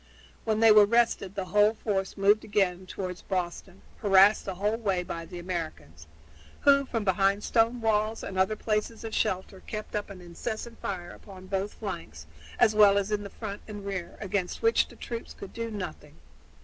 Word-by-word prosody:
When 220 -1 +1
they 225 -1 +8
were 210 -1 +8
rested 225 -4 +1
the 195 -2 -2
whole 210 +1 +5
force 195 -3 -2
moved 205 +2 +4
forward - - -19
again 190 -3 0
toward 185 -1 -5
Boston, 180 0 -3 0.2
harassed 200 0 +5
the 190 - -4
whole 210 +4 0
way 195 -6 0
by 165 -1 -6
the 180 - -8
Americans, 155 - -6 0.5
who 280 -1 +5
from 230 -4 -2
behind 195 +1 +2
stone 230 +1 +2
walls 220 0 +1
and 195 - -6
other 190 +3 +2
places 215 +2 -2
of 225 -1 -6
shelter 190 +1 -1
kept 215 -1 -5
up 210 0 -2
an 195 -2 -9
incessant 220 +7 -6
fire 175 -3 -4
upon 190 -2 -12
both 195 +1 -3
flanks, 165 - -7 0.3
as 215 - +5
well 205 -1 +6
as 200 +1 -1
in 210 -1 0
the 200 - -7
front 205 0 -7
and 205 -2 -8
rear, 190 -3 -5
against 195 - -3
which 455 0 +4
the - - -15
troops 230 -1 -7
could 200 - -10
do 230 0 -4
nothing. 180 -8 -7
200 Hz, 190 wpm, -28 LUFS, 185-215 Hz, 0.5 s, they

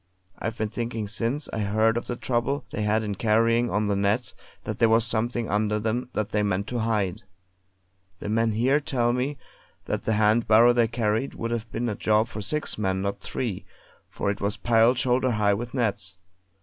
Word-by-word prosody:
I've 110 +1 -3
been 110 -1 -1
thinking 115 -1 -3
since 115 +7 -2
I - - -2
heard 110 +2 +2
of 120 - -3
the 120 - -2
trouble 125 +4 -1
they 110 - -3
had 105 +1 +1
in 105 -1 -2
carrying 115 +3 +2
on 105 +1 0
the 100 -1 +1
nets, 100 +4 0 0.3
that - - -5
there 115 - +5
was 115 0 +4
something 115 +1 -1
under 105 +1 +1
them 115 +3 -2
that 105 -1 -1
they 105 - +1
meant 100 -1 0
to 125 - -2
hide. 105 -5 0 1.0
The - - -7
men 115 +1 +1
here 130 +7 +3
tell 125 -6 0
me 135 +3 -1 0.5
that - - -3
the 110 - +1
hand 110 +2 +3
barrow 115 +3 +6
they 120 -1 +3
carried 110 +2 -1
would 115 0 -4
have 115 -1 -3
been 120 +1 -2
a 110 - -1
job 110 +2 +1
for 105 - -6
six 130 +4 -2
men, 95 -2 0
not 100 0 -2
three, 115 -8 -4 0.5
for 100 - -1
it 100 - -6
was 100 +1 -1
piled 115 +3 +3
shoulder 130 0 +2
high 105 -3 +2
with 120 +5 -4
nets. 100 -7 -1
110 Hz, 200 wpm, -25 LUFS, 105-120 Hz, 1.0 s, barrow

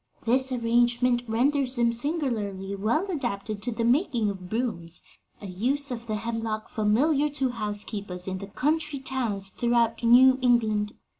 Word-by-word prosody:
This 260 +3 +2
arrangement 240 0 +2
renders 260 +3 +1
them 235 -1 +2
singularly 230 - -1
well 225 - 0
adapted 220 - -3
to 240 - -2
the 230 0 -2
making 240 - +2
of 185 -2 -9
brooms 205 -8 -3 0.4
a - - -10
use 255 +10 -1
of 235 -1 -6
the 215 - -1
hemlock 225 0 -3
familiar 275 +8 +2
to 270 -3 -1
housekeepers 205 -4 -4
in 190 0 -3
the 200 - -7
country 300 +6 -1
towns 240 -8 -2
throughout 235 +2 +1
New 255 +3 +6
England. 220 -4 +2
235 Hz, 145 wpm, -26 LUFS, 210-260 Hz, 0.4 s, New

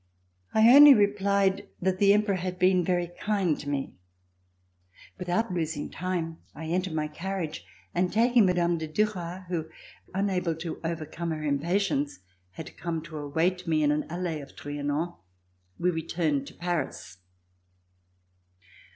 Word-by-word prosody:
I 220 +1 +5
only 290 -1 +11
replied 200 -2 +2
that 185 0 0
the 200 -1 +6
Emperor 205 -1 +3
had 180 0 -4
been 185 0 +4
very 175 0 0
kind 195 -7 +1
to 145 - -6
me. 140 -1 -2 1.3
Without 180 +4 -1
losing 160 -3 -3
time, 170 -2 -3 0.2
I 160 - -7
entered 180 +1 -1
my 155 -1 0
carriage 170 0 -4 0.3
and 180 +1 +1
taking 230 -1 +4
Mme. 175 -2 +1
de 160 - -4
Duras 180 0 -2
who, 160 -3 -3 0.4
unable 185 -3 0
to 165 0 -6
overcome 165 +1 -4
her 155 -1 -3
impatience, 150 - 0 0.4
had 160 - -9
come 165 -2 -3
to 160 -2 -8
await 170 +5 -1
me 155 -2 +2
in 145 - +3
an 150 +1 -1
alley 170 -2 -3
of 140 - -13
Trianon, 145 +4 -3 0.6
we 180 +1 +1
returned 160 -4 -1
to - - -12
Paris. 155 - -4
175 Hz, 140 wpm, -27 LUFS, 155-190 Hz, 1.3 s, only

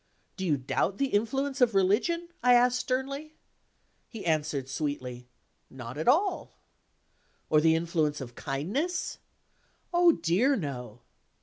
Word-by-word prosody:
"Do 190 -2 -3
you 150 -3 +2
doubt 140 +9 -1
the 275 -1 0
influence 270 +6 0
of 235 -4 +4
religion?" 250 - +2
I 250 0 +6
asked 250 +1 +4
sternly. 275 +5 -3 0.7
He 225 -5 -9
answered, 150 -4 0
sweetly: 130 -4 -4 0.4
"Not 125 -2 -8
at 155 +2 -4
all" 370 +3 +1 0.9
"Or 155 -1 +5
the 160 0 +4
influence 160 -3 0
of 125 -3 -8
kindness?" 195 - -3 0.7
"Oh, 345 -1 +6
dear, 190 - +2
no!" 125 - -6
185 Hz, 125 wpm, -28 LUFS, -, 0.9 s, I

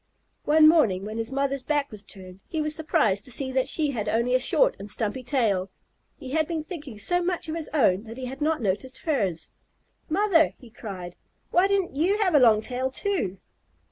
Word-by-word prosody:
One 310 +1 +6
morning, 220 - +3
when 215 +2 -5
his 225 +2 -2
mother's 275 0 -1
back 290 0 -1
was 210 -2 -8
turned, 185 -2 -12
he 320 - -3
was 305 0 0
surprised 305 - +1
to 255 - -8
see 260 +3 -1
that 260 0 +1
she 300 0 +1
had 220 -6 -3
only 235 +2 +1
a 255 - +4
short - - +2
and 205 - -7
stumpy 215 +4 -2
tail. 220 -8 0 0.5
He 260 - -9
had 315 +1 +1
been 325 -3 -3
thinking 300 - -8
so 355 - +1
much 355 -1 -2
of 315 - -3
his 330 -2 -4
own 215 -9 +2
that 225 +2 -9
he 260 - -5
had 265 +3 -7
not 310 -4 0
noticed 215 +7 -2
hers. 200 - -1 0.6
"Mother," 340 -1 +3
he 245 -4 -16
cried, 185 -6 -8 0.3
"why 360 +2 +4
didn't 390 -7 0
you 360 +8 +2
have 395 -5 +1
a 295 - +6
long 225 -4 +5
tail 255 +3 -2
too?" 265 - -2
265 Hz, 205 wpm, -25 LUFS, 215-315 Hz, 0.6 s, One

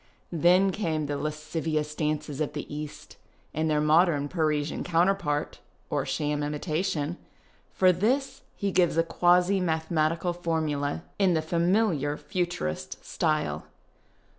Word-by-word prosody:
Then 180 +4 +4
came 160 -7 -1
the 145 0 -2
lascivious 155 0 -2
dances 150 -1 -2
of 150 - -1
the - - -4
East, 150 0 -8 0.4
and 160 +1 0
their 150 -1 +2
modern 150 -1 +3
Parisian 155 -3 0
counterpart 170 -3 +1 0.2
— - - -38
or - - 0
sham 150 0 -1
imitation. 155 +2 -2 0.5
For 185 -1 +4
this 260 +9 0
he 200 -1 -1
gives 175 -3 +2
a 165 - +5
quasi 180 +3 +3
mathematical 160 0 0
lornuda 160 -3 -1 0.2
in 190 -3 +4
the 160 - +2
familiar 170 -3 +1
Futurist 80 - -3
style. 155 - -1
160 Hz, 125 wpm, -27 LUFS, 150-180 Hz, 0.5 s, a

